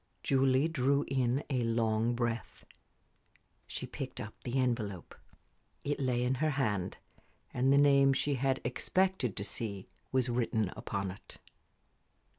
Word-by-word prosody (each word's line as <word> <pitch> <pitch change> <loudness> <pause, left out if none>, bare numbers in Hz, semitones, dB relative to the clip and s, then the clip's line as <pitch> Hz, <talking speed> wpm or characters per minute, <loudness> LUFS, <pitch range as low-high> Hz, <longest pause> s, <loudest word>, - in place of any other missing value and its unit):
Julie 135 +1 +3
drew 140 -2 +1
a 130 +1 0
long 115 0 +1
breath. 120 -1 -3 1.0
She - - -5
picked - - -6
up - - -6
the 125 +2 -2
envelope. 115 -8 -1 0.7
It 145 +1 -1
lay 125 -2 +1
in 125 +1 +1
her 155 - +3
hand, 110 -10 -1 0.6
and 130 +2 +2
the 140 - +6
name 140 -1 +6
she 145 +2 0
had 135 0 0
expected 180 - 0
to 100 - -1
see 100 -1 -3 0.2
was 130 -1 +2
written 115 -4 0
upon 100 -2 -3
it. 95 - -13
125 Hz, 130 wpm, -32 LUFS, 115-135 Hz, 1.0 s, the